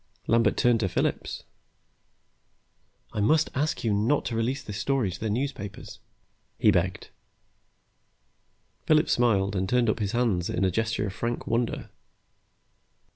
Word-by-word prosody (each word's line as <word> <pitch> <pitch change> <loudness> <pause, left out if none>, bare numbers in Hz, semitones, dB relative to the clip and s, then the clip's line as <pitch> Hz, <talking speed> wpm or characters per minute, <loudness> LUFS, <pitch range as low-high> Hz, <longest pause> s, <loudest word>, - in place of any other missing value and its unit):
Lambert 115 +1 +3
turned 120 -2 +3
to 95 -4 0
Phillips. 90 - -2 1.7
"I - - -3
must 155 +9 +3
ask 150 +3 -1
you 110 -3 +1
not 110 +8 +1
to 115 - -3
release 125 +4 -1
this 105 0 -6
story 130 -4 0
to 95 - -8
the 110 - -2
newspapers," 105 -4 -4 0.6
he - - +5
begged. - - -1 1.8
Phillips 155 0 +4
smiled 105 -5 +2
and 95 0 -1
turned 120 -2 +3
up 110 - -5
his 100 -2 -2
hands 110 -8 +1
in - - -1
a 95 - +2
gesture 110 +2 -1
of 100 - -4
frank 120 +3 -3
wonder. 115 0 -2
115 Hz, 140 wpm, -27 LUFS, 100-125 Hz, 1.8 s, he